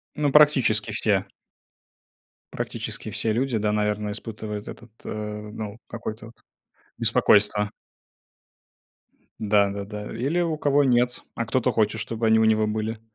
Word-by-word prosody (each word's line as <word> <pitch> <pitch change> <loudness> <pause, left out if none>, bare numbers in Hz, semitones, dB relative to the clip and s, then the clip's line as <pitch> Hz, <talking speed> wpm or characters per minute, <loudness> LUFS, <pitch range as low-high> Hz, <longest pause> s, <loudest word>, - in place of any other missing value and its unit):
Ну, 145 -2 +1
практически 130 -8 +4
все. 105 -2 +1 1.3
Практически - - -4
все 110 +1 0
люди, 125 0 0
да, 105 0 0
наверное, 105 0 -1
испытывают 105 -1 -6
этот, 120 -1 -10
э, - - -5
ну, 105 0 -6
какое-то 110 -1 -6
вот 115 - -15 0.6
беспокойство. 105 0 +3 1.7
Да 105 -2 +3
да 100 0 -4
да. 105 0 -7
Или 140 +10 0
у 165 -3 -1
кого 145 -1 +3
нет, 125 -1 +2
а 115 - -2
кто-то 125 +2 +1
хочет, 110 -1 +1
чтобы 115 +1 -2
они 110 0 +5
у 110 - +4
него 110 -1 +3
были. 110 +1 -3
110 Hz, 135 wpm, -24 LUFS, 105-120 Hz, 1.7 s, они